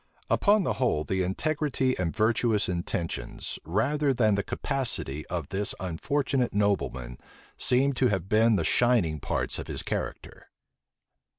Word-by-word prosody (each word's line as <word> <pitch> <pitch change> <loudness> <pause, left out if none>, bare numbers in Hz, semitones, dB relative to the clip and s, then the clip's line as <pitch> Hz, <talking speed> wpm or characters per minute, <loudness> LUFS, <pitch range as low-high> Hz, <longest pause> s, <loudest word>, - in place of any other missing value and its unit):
Upon 205 -1 +4
the - - 0
whole, 95 -12 +2
the 95 +3 -1
integrity 135 - 0
and 90 -3 -1
virtuous 110 0 +1
intentions, 85 -7 -3
rather 135 - +1
than 110 -3 +3
the 100 - +1
capacity, 115 - -3
of 85 0 -4
this 100 +1 -1
unfortunate 125 - -1
nobleman, 65 -12 -1 0.4
seem 135 +3 +3
to 130 - +6
have 95 -5 -1
been 110 +2 +4
the 85 - +1
shining 110 -11 +2
parts - - -2
of - - -6
his - - -3
character. - - -5
105 Hz, 135 wpm, -27 LUFS, 90-130 Hz, 0.4 s, to